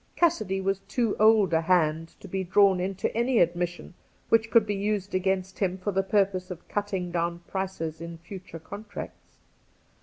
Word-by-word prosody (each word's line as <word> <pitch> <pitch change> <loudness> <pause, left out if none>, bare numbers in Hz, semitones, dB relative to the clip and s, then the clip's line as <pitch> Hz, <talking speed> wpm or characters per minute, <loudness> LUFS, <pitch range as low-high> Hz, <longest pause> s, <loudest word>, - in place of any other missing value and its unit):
Cassidy 215 - +1
was, 195 0 0
too 235 -4 0
old 215 -4 +5
a 160 - +4
hand 165 -2 +1
to - - -9
be 190 +1 -2
drawn 190 +1 +4
into 190 +2 -2
any 240 +2 +2
admission 175 0 0 0.4
which 225 0 +3
could 230 -2 +5
be 205 - -1
used 200 0 -2
against 190 0 -1
him 190 -2 0
for 190 +2 -2
the 195 0 +2
purpose 195 -2 +1
of 180 -2 -8
cutting 195 -4 -2
down 170 0 -2
prices 165 -5 -4
in 170 0 -7
future 175 0 -9
contracts. 200 +6 -9
190 Hz, 170 wpm, -27 LUFS, 175-205 Hz, 0.4 s, old